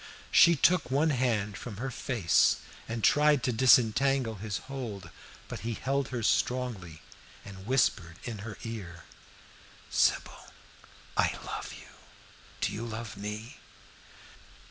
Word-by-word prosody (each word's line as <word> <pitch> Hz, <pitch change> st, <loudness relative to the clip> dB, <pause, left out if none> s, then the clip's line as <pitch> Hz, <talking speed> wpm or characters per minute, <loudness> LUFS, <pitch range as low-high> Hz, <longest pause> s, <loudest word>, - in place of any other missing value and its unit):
She 170 Hz, 0 st, +7 dB
took 165 Hz, -1 st, +3 dB
one 150 Hz, +4 st, +2 dB
hand 115 Hz, -6 st, 0 dB
from 105 Hz, +1 st, -8 dB
her 130 Hz, +4 st, -4 dB
face 115 Hz, -, +2 dB, 0.3 s
and 115 Hz, -1 st, -4 dB
tried 150 Hz, -3 st, +4 dB
to 125 Hz, -, +1 dB
disentangle 125 Hz, +1 st, +4 dB
his 105 Hz, 0 st, -4 dB
hold, 110 Hz, -11 st, -6 dB, 0.4 s
but -, -, -6 dB
he 115 Hz, 0 st, -3 dB
held 135 Hz, +2 st, -1 dB
her 120 Hz, -3 st, -4 dB
strongly, 110 Hz, -10 st, -1 dB, 0.4 s
and 95 Hz, 0 st, -10 dB
whispered 95 Hz, -10 st, +1 dB
in 115 Hz, -4 st, -5 dB
her 105 Hz, 0 st, -7 dB
ear, 95 Hz, -7 st, -7 dB, 0.9 s
"Sybil, -, -, +1 dB, 0.7 s
I -, -, +1 dB
love -, -, -5 dB
you -, -, -13 dB, 0.8 s
do -, -, +1 dB
you 110 Hz, -, -4 dB
love 115 Hz, -1 st, -6 dB
me?" 105 Hz, +6 st, -6 dB
115 Hz, 125 wpm, -29 LUFS, 105-130 Hz, 0.9 s, She